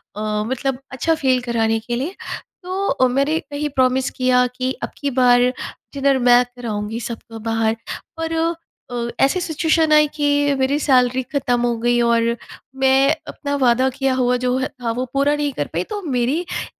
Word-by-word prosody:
अ, 210 0 -2
मतलब 260 +1 -2
अच्छा 325 +5 0
फ़ील 260 -4 +1
कराने 225 -2 0
के 240 +2 -4
लिए। 300 +10 -3 0.5
तो 380 +2 -2
अ, 255 - +3
मैंने 275 +5 +1
वही 295 +1 -2
प्रॉमिस 260 -1 +1
किया 250 -1 +2
कि, 255 +1 -3
"अब - - -2
की 285 - -2
बार 245 -1 +4 0.5
डिनर 275 -1 +2
मैं 245 +1 +7
कराऊँगी 220 -2 -4
सबको 225 -1 -8
बाहर।" 225 0 +1 0.4
पर 325 0 -3 0.6
अ, 235 -1 -2
ऐसी 275 +7 +3
सिचुएशन 320 -1 +1
आई 300 0 +6
कि 290 -1 +2
मेरी 270 +2 +2
सैलरी 255 -2 +3
ख़त्म 250 -4 +1
हो 240 -1 0
गई 240 +1 +2
और 235 0 +2 0.5
मैं 270 +3 +4
अपना 285 -1 -4
वादा 255 0 +3
किया 270 0 -1
हुआ, 250 -1 +2
जो 250 +1 0
था, 245 -4 -3
वो 250 +3 -2
पूरा 280 +2 +2
नहीं 295 -1 -1
कर - - -3
पाई। - - 0
तो 415 -1 -4
मेरी 265 -1 0
उस - - -5
255 Hz, 175 wpm, -20 LUFS, 240-285 Hz, 0.6 s, मैं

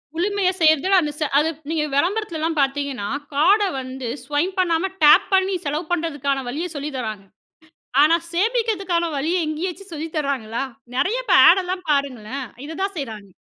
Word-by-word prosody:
முழுமையா 380 +1 +1
செய்றதுல, 315 +5 +4
அந்த, 300 -1 -2
ச - - -12 0.2
அது 310 +2 +3 0.2
நீங்க 320 -2 0
விளம்பரத்துலல்லாம் 330 -2 0
பார்த்தீங்கன்னா, 275 -6 -1 0.3
கார்ட 385 +9 +4 0.2
வந்து 260 -1 -6 0.2
ஸ்வைப் 320 +7 -1
பண்ணாம, 355 +1 +1
டேப் 345 +7 +7
பண்ணி 380 0 +3
செலவு 300 +4 -2
பண்றதுக்கான 285 -5 -1
வழிய 320 +7 -3
சொல்லி 290 +1 -4
தராங்க. 215 -5 -5 0.8
ஆனா, 315 +3 +5 0.2
சேமிக்கிறதுக்கான 390 -5 0
வழிய 330 +4 0
எங்கேயாச்சும் 360 +4 -5
சொல்லி 320 +2 -5
தராங்களா? 270 -5 -2 0.3
நெறைய 470 - 0
இப்ப - - +3
ஆட் 380 - +6
எல்லாம் 365 0 -4
பாருங்களேன் 270 -2 -2 0.2
இததான் 380 +5 -4
செய்றாங்க. 215 -8 -6
320 Hz, 145 wpm, -22 LUFS, 280-370 Hz, 0.8 s, டேப்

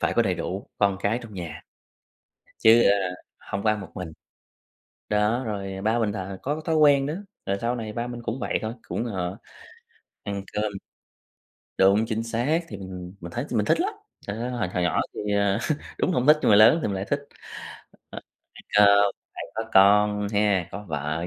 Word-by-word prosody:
phải - - 0
có - - +4
đầy - - 0
đủ 95 +2 -4
con 100 -2 +2
cái 105 +4 +1
trong 110 -3 -11
nhà, 85 -4 -7 1.0
chứ, 115 +1 +6
ờ, 100 - +4 0.4
hông 100 0 -5
có 110 - +3
ăn 105 -1 -1
một 90 -4 -9
mình 90 -4 -6 1.0
đó. 105 +4 +1
rồi 95 -3 -4
ba 110 +3 +2
mình 110 -3 +1
là 95 -1 -5
có 150 +3 -2
thói 160 -1 +1
quen 145 -3 +5
đó, 150 - -2 0.3
rồi 100 - 0
sau 120 +1 0
này 110 -2 -5
ba 120 +1 -3
mình 120 -1 -7
cũng 115 +3 -3
vậy - - 0
thôi, 110 +2 -3
cũng, 115 - -2
ờ, 95 -4 -3 0.9
ăn 100 -1 -4
cơm 105 0 -1 1.1
đúng, 100 +3 +4
chính 110 0 -2
xác, 120 +8 0
thì 100 - -7
mình 90 -2 -8
mình 85 0 -8
thấy 120 +8 -3
mình 105 -4 +1
thích - - +2
lắm. 400 +5 0 0.3
Ơ, 115 +4 -3
hồi 120 -7 -2
hồi 90 0 -2
nhỏ 85 - +1
thì, 105 0 -3
ờ, 100 0 +2 0.4
đúng - - +1
là - - -1
hổng 130 - -1
thích 150 0 +8
nhưng - - +2
mà 100 - +7
lớn 115 +10 +7
thì - - -1
mình 100 - -2
lại 95 +1 -3
thích, 140 - -1 0.9
ờ, - - -7 0.4
phải, 105 0 +3
ơ, 100 0 +6 0.3
phải - - -5
có 110 0 -4
con 105 +1 +5
nha, 100 -3 +1
có 105 +2 -7
vợ 80 +2 -2
105 Hz, 205 wpm, -25 LUFS, 95-115 Hz, 1.1 s, thích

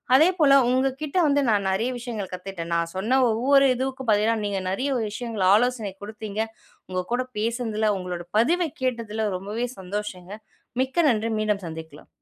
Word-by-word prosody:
அதேபோல 315 -1 +5 0.2
உங்க 260 +2 +3
கிட்ட 305 +3 -3
வந்து 285 0 +3
நான் 200 -2 +2
நெறைய 220 +6 0
விஷயங்கள் 230 -6 -5
கத்துக்கிட்டேன். 180 -2 -6
நான் 170 0 0
சொன்ன 225 +8 +2
ஒவ்வொரு 270 +5 +4
இதுவுக்கும் 260 -1 -3
பார்த்தீங்கன்னா, 215 +2 +3
நீங்க 200 -1 -1
நெறைய 255 +9 -1 0.2
விஷயங்கள 225 -4 -2
ஆலோசனை 235 -2 +1
குடுத்தீங்க. 215 0 -6 0.5
உங்க 185 0 -2
கூட 255 +1 +1 0.2
பேசினதில, 220 -1 0
உங்களோட 180 -2 -5
பதிவை 335 +8 +2
கேட்டதில, 225 -4 -1
ரொம்பவே 210 +6 -3
சந்தோஷங்க. 190 -1 -5 0.5
மிக்க 265 +6 +1
நன்றி. 225 -1 +1
மீண்டும் 210 -2 0
சந்திக்கலாம். 160 -2 -9
220 Hz, 145 wpm, -25 LUFS, 195-255 Hz, 0.5 s, அதேபோல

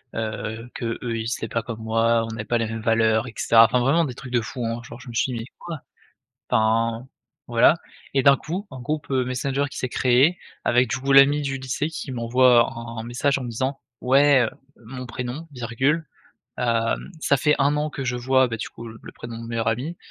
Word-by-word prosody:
heu, 110 +1 -4
qu'eux, 115 -1 -3 0.2
ils 110 - -3
étaient 115 -1 -3
pas 115 +1 -1
comme 115 -2 -6
moi. 115 +1 +2
On - - -7
n'avait 110 -1 -5
pas 120 +2 +1
les 115 - -1
mêmes 110 0 -5
valeurs 115 0 +2
et 115 - -9
cetera. 115 0 +6
Enfin, 125 +2 +1
vraiment 150 +7 +3
des 125 - -5
trucs 130 -2 -10
de 120 - +3
fou, 120 +2 -5
hein, 115 +1 -3
genre, 120 +1 -11
je 130 - -11
me - - -8
suis 125 +2 0
dit: 115 - -3
«Mais 115 - -6
quoi?» 165 -4 -6 0.7
Enfin, 115 +1 +1 0.4
voilà 120 +6 +5 0.4
et 135 - +2
d'un 140 -2 +6
coup, 185 +6 -5
un 130 - -8
groupe, 150 +4 -3
heu, 130 -1 +1
Messenger 135 +2 -1
qui - - -9
s'est 130 - -2
créé 130 +9 +3 0.3
avec, 125 -1 +3
du 130 - -1
coup, 135 +1 -1
l'ami 140 +2 +6
du 135 -1 -2
lycée 130 +3 -2
qui 150 -4 -6
m'envoie 120 0 +4
un 115 0 -8
un - - -5
message 125 +4 0
en - - -6
me 120 - -5
disant: 130 +4 -2 0.2
«Ouais, 135 0 +5
heu, 110 - 0 0.4
mon 125 +1 -7
prénom, 125 +6 -5
virgule, 130 +6 -1 0.5
hem, 115 +5 0
ça 140 - +3
fait 150 +2 +3
1 140 +2 +2
an 150 +1 -1
que 135 - -5
je 125 0 -1
vois, 130 +1 +3
bah, 115 - -3
du 115 - -5
coup, 115 0 -10
le 110 0 -11
le - - -10
prénom 115 -1 -8
de 115 - -8
mon - - -7
meilleur 115 -1 -1
ami, 135 +10 -2
125 Hz, 235 wpm, -23 LUFS, 115-135 Hz, 0.7 s, cetera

